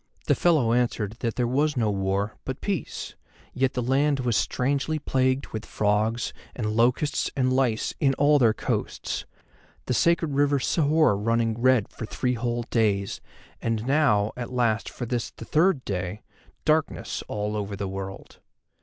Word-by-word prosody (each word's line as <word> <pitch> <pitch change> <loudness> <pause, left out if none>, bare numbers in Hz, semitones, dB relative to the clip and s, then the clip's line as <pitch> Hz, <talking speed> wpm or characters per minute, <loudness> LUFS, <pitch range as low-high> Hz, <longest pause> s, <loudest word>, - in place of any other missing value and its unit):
The - - +3
fellow 150 -10 +3
answered 115 -3 0
that 115 -2 -2
there 125 - +1
was 140 +4 +1
no 110 -3 +2
war, 100 +1 -1
but 130 +1 -5
peace, 195 -6 -3 0.4
yet 130 0 +1
the 125 - -1
land 135 +2 +2
was 120 -3 0
strangely 140 +7 0
plagued 130 -2 0
with 110 -1 -5
frogs 110 +3 0 0.2
and 105 -3 -2
locusts 125 +6 +2
and 130 -1 +2
lice 125 -4 +1
in 135 -2 +3
all 145 +1 +4
their 115 -4 +5
coasts, - - -3 0.6
the 125 - -1
sacred 165 +3 +2
river 145 0 +3
Sihor 150 - +3
running 115 +2 +1
red 130 -4 +4
for 110 - -8
three 125 +2 -1
whole 120 0 -2
days, 100 -4 +1 0.4
and 115 -1 -1
now, 135 -7 +3
at 125 -1 -6
last, 115 -3 +1
for 120 - -6
this 120 -1 -2
the 115 - -11
third 160 -1 +2
day, 90 +1 -3 0.4
darkness 155 0 0
over 105 0 -2
all - - -1
the 100 -1 -4
world. 95 0 -7
120 Hz, 160 wpm, -26 LUFS, 110-140 Hz, 0.6 s, their